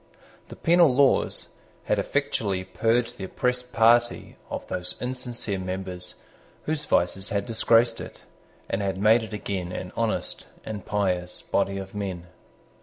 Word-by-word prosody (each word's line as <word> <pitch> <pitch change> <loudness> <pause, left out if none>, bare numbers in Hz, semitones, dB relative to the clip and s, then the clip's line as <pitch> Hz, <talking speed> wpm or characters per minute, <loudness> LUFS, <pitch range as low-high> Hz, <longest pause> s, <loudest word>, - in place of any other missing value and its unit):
The - - -10
penal 170 -3 +5
laws 140 0 +3 0.3
had - - +1
effectually 95 -2 0
purged 115 +5 0
the 95 - -3
oppressed 125 +4 -1
party 120 +1 +3
of - - -4
those 90 0 -4
insincere 120 -5 -2
members 95 -1 -4 0.5
whose 155 -1 -2
vices 95 +3 +1
had 100 -3 -1
disgraced 115 0 +3
it, - - -10 0.4
and 95 - -1
had 95 -2 -1
made 110 +4 +5
it 110 -1 -7
again 95 -4 -3
an 90 0 -5
honest 115 -1 -2 0.2
and 105 -3 -5
pious 90 -4 -1
body 100 0 0
of 95 0 -7
men. 95 -4 -4
105 Hz, 140 wpm, -26 LUFS, 95-120 Hz, 0.5 s, penal